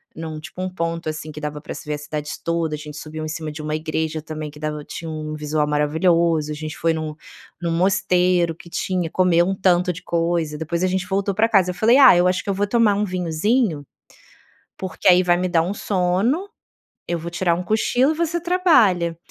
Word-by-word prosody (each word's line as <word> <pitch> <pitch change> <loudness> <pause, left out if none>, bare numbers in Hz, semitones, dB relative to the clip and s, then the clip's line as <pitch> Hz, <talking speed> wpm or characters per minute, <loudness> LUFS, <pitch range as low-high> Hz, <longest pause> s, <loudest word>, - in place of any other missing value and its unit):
num 160 -1 -6
tipo 185 +2 -8
um 185 - -2
ponto, 165 -2 -3
assim, 155 0 -6
que 150 - -8
dava 150 -1 -5
pra - - -7
se - - -10
ver 150 - -1
a - - -5
cidade 150 0 -5
toda, 165 -2 -1
a - - -6
gente 150 0 -9
subiu 155 +1 -7
em - - -4
cima 155 0 -4
de 150 +1 -7
uma 150 0 -3
igreja 155 0 -2
também 155 -1 -6
que 150 - -14
dava 150 -1 -4
tinha 165 -1 -7
um 155 0 -5
visual 150 0 -1
maravilhoso, 160 +1 +2
a 150 - -3
gente 155 0 -6
foi 165 - +1
num 155 -1 -4 0.5
num 170 - -1
mosteiro 180 -1 +2
que 170 - -14
tinha 180 -1 -2
comeu 175 -1 +3
um 195 - 0
tanto 180 -1 +2
de 170 - -11
coisa, 165 -3 -1
depois 170 +3 -2
a 185 - +3
gente 185 0 -1
voltou 200 +1 0
pra 220 +3 +3
casa. 190 -4 +4
Eu - - -9
falei: 230 +7 +4
"Ah, 255 -10 +8
eu 180 - +4
acho 185 0 0
que - - -6
eu - - +2
vou 205 +1 0
tomar 210 -2 +3
vinhozinho, 180 - 0 0.9
porque 190 0 -4
aí 180 0 +7
vai 175 -1 +3
me 180 0 -1
dar 165 -2 +3
um 180 +4 -2
sono, 205 - 0 0.6
eu 175 - -1
vou 170 +1 -6
tirar 170 -1 +1
um 180 - -4
cochilo 245 - +2
e - - -8
você 340 0 -1
trabalha.". 230 - +3
170 Hz, 225 wpm, -21 LUFS, 155-185 Hz, 0.9 s, Ah